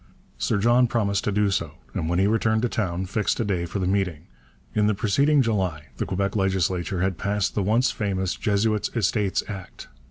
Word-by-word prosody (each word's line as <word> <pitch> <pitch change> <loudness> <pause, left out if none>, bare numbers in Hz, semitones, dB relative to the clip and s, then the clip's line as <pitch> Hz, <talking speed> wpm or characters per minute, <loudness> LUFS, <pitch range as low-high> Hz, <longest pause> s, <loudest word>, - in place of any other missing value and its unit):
Sir 110 - +1
John 120 +4 +4
promised 100 -4 0
to 105 - +1
do 105 0 +2
so, 85 -5 -2 0.2
and 80 - -2
when 85 - +1
he 95 - +3
returned 110 +1 +2
to - - +3
town 95 -6 -2
fixed 105 +3 -1
a 115 - +1
day 90 -4 -1
for 100 - -4
the 95 - -1
meeting. 95 -5 -1 0.5
In 105 -1 +2
the 105 - +2
preceding 140 +8 +3
July 95 -9 -1
the - - -2
Quebec 100 +1 -1
legislature 95 -3 0
had 95 -2 -1
passed 100 -1 0
the 105 - 0
once 115 +6 +2
famous 95 -3 -2
Jesuits' 105 -1 0
Estates 105 -2 +1
Act. 95 -4 -8
100 Hz, 195 wpm, -24 LUFS, 95-110 Hz, 0.5 s, John